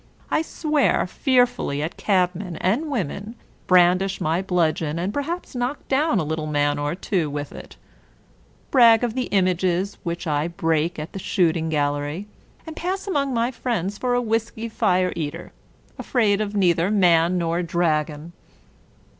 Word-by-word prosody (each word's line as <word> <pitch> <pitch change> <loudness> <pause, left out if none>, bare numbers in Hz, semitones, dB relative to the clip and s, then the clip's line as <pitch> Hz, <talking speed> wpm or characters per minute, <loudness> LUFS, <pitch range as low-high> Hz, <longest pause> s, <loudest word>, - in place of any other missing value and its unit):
I - - +2
swear 305 -2 +1
fearfully 245 - +1
at 160 - -4
cabmen 180 -2 0
and 225 - 0
women; 210 - -3 0.3
brandish 185 +2 +4
my 170 0 0
bludgeon, 165 -4 0
and 185 +4 -2
perhaps 330 +5 -4
knock 250 +3 -3
down 280 -2 +2
a 175 - +1
little 155 0 -3
man 145 -1 +1
or 145 +2 -2
two 180 -4 -1
with 145 0 -5
it: - - -11 1.0
brag 235 -3 +6
of 240 -2 0
the 255 0 -1
images 185 0 0
which 170 +1 -4
I 150 0 0
break 165 -1 -1
at 155 +1 -6
the 195 - -5
shooting 165 -3 +1
gal 145 -2 +1
lery, 145 +7 -4 0.4
and 320 -1 -8
pass 375 +3 -3
among 280 -9 -1
my 235 +2 +1
friends 210 -6 -3
for 245 -1 0
a 245 - +2
whiskery 225 0 -2
fire 185 -4 +1
eater, 160 +1 -5 0.5
afraid 215 -5 +1
of 210 -1 -3
neither 175 -2 +2
man 180 -3 +3
nor 170 0 0
dragon. 165 -2 -1
185 Hz, 155 wpm, -23 LUFS, 165-230 Hz, 1.0 s, brag